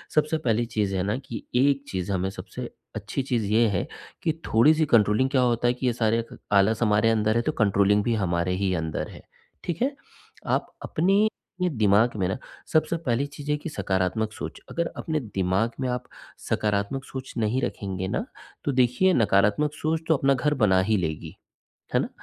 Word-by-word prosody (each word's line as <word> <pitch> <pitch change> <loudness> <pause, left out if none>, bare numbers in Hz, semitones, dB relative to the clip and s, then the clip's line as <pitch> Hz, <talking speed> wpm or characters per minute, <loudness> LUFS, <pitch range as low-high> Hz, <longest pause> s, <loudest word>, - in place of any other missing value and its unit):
सबसे 155 +1 +2
पहली 120 -5 +1
चीज़ 105 -4 -1
है 90 - 0
ना, 105 +5 -1
कि 130 -4 -7
एक 140 +2 +3
चीज़ 95 +1 -3
हमें 95 0 0
सबसे 95 - -7 0.3
अच्छी 105 +4 -3
चीज़ 120 -5 -1
ये 115 +1 +5
है, 95 -3 -1 0.4
कि 160 - +2 0.2
थोड़ी-सी 155 +8 +4
कंट्रोलिंग 115 +1 +3
क्या 130 -2 +2
होता 120 -1 +2
है 120 - +3
कि 125 +1 -5
ये 120 - +2
सारे 115 0 +1
ख - - -10 0.2
आलस 105 +3 +4
हमारे 105 +1 +3
अंदर 110 0 +2
है 120 - +3
तो - - 0
कंट्रोलिंग 100 -1 +3
भी 120 - +1
हमारे 90 -3 0
ही 95 -1 0
अंदर 80 -2 -3
है, - - -12 0.4
ठीक 175 +4 -4
है? 275 +2 +1 0.5
आप - - -1
अपने 195 +6 +2 0.3
ये 180 - +2
दिमाग 110 - +3
में 95 - +1
ना 95 - -2 0.4
सबसे 160 +1 +2
पहली 135 -4 0
चीज़ 145 0 -9
है 150 - +3
कि 150 - -6
सकारात्मक 95 -2 -1
सोच, - - -7
अगर 170 0 -1
अपने 155 -1 -1
दिमाग 100 -2 0
में 130 - -1
आप 125 0 -2 0.5
सकारात्मक 105 +5 0
सोच 130 -1 -7
नहीं 115 +4 +1
रखेंगे 95 -5 -3
ना, - - -2 0.4
तो 145 - 0
देखिए 130 +9 +3
नकारात्मक 105 - +3
सोच 155 +1 -1
तो 160 - +4
अपना 135 0 +3
घर 150 +3 +1
बना 95 -3 +5
ही 110 - +4
लेगी, 80 0 -4 0.6
है - - +5
ना? - - -2
115 Hz, 195 wpm, -25 LUFS, 100-135 Hz, 0.6 s, ये